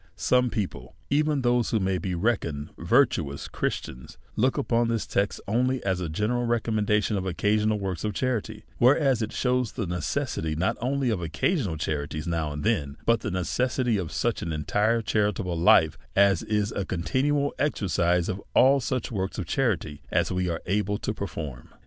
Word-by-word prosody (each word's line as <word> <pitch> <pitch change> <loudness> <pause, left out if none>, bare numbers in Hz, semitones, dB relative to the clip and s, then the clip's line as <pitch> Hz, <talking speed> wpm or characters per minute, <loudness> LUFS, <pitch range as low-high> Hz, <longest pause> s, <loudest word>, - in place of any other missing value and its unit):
Some 125 0 +2
people, 90 - -4 0.2
even 150 +1 +2
to 140 - 0
those 120 -1 +2
who 110 - +1
may 95 -1 0
be 90 +1 -3
reckoned 85 -7 -1
virtuous 85 - +2
Christians, 65 -1 -4 0.2
look 130 +6 +2
upon 120 -4 +1
this 115 -2 -1
text 100 0 -1
only 125 +5 +1
as 95 -2 0
a 85 - -3
ge 80 +6 -4
neral 120 +3 +1
recommendation 110 -2 +1
of 95 0 -3
occasional 105 +4 +1
works 95 -3 -4
of 105 -2 -2
charity; 110 -4 -2 0.2
whereas 135 -1 +4
it 110 - -2
shews 125 -2 0
the 110 - -3
necessity 80 -2 -2
not 90 +4 0
only 130 0 0
of 100 -5 -1
occasional 85 - -1
charities 75 0 -3
now 80 -3 -1
and 75 0 -5
then, 80 -11 0
but 115 0 +3
the 105 - -4
necessity 120 - 0
of 90 -5 -4
such - - -1
an 85 - -3
entire 105 +10 +1
charitable 105 -4 0
life, 80 -3 +4 0.2
as 100 0 +4
is 105 -1 0
a 100 - -2
continual 135 +11 0
exercise 90 - +1
of 95 +1 -3
all 135 +2 +6
&uch 125 0 -2
works 95 -3 -3
of 90 - -3
charity 85 - -1
as - - +1
we 90 0 0
are 85 -1 -3
able 105 +1 0
to 105 - -3
j)erform. 75 - -6
105 Hz, 180 wpm, -26 LUFS, 85-120 Hz, 0.2 s, all